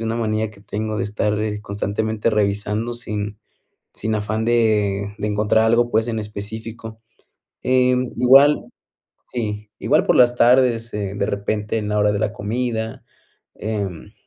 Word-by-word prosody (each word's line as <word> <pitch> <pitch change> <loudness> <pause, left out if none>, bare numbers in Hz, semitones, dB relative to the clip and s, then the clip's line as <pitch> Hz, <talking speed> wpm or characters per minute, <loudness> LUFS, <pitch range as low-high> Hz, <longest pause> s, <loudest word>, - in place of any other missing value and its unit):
una 115 0 -1
manía 110 -1 -1
que 100 -2 -17
tengo 110 +1 -4
de - - 0
estar, 105 0 -1
eh, 105 -1 -2
constantemente 105 +2 -2
revisando 105 +2 0
sin 105 -3 -5 0.6
sin 110 0 -2
afán 110 +1 -2
de 105 -4 +1
de 105 - -2
encontrar 105 +1 +2
algo 120 +1 +3
pues, 110 +2 +2
en 115 -1 -2
específico, 110 +2 -7 0.6
em, 125 -1 +2
igual. 135 +4 +6 0.7
Sí, 105 -3 -3
igual - - +2
por - - +3
las 125 -1 +5
tardes, 120 -2 +3
eh, 100 -2 -3
de 100 - 0
repente, 105 +1 -2
en 105 -1 -3
la 105 0 +1
hora 105 0 +3
de 100 - -1
la 105 -1 0
comida, 110 +1 -3 0.5
em, 100 -6 -4
110 Hz, 150 wpm, -21 LUFS, 105-115 Hz, 0.7 s, igual